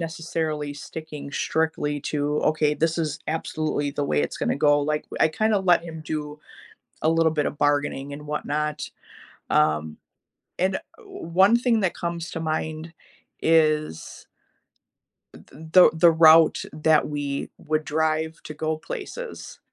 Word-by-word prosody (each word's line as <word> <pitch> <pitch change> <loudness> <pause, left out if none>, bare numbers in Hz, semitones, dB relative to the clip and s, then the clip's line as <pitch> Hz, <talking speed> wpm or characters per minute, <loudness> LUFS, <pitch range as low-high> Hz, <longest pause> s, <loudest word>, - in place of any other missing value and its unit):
necessarily 160 -3 -3
sticking 150 -1 -8
strictly 150 -1 -1
to, 145 +1 -1
"Okay, 150 -1 +1
this 165 +2 0
is 155 -2 -2
absolutely 155 -2 -2
the 145 - -2
way 75 - +1
it's 75 - -4
gonna - - 0
go," 145 0 +4
like, 150 +1 -1 0.2
I - - +5
kinda 215 +4 +1
let 175 -2 +3
him 160 -1 -8
do 150 -1 -5 0.6
a 160 - +4
little 165 -1 +3
bit 150 -2 0
of 145 - -4
bargaining 145 -1 0
and 150 +1 -9
whatnot. 150 0 -3 0.6
Um, 75 0 +1 0.6
and 190 +1 +1 0.3
one 190 - +2
thing 240 -2 +2
that 185 - +1
comes 170 0 -4
to 165 - -4
mind 160 0 -3 0.5
is 155 - +1 1.1
th - - -14
the 160 +5 +5
the 165 +1 +6
route 160 0 +6
that 155 0 +2
we 145 -2 -3
would 155 0 -2
drive 160 +1 0
to - - -7
go 155 +1 -2
places. 475 - -8
155 Hz, 140 wpm, -24 LUFS, 150-165 Hz, 1.1 s, the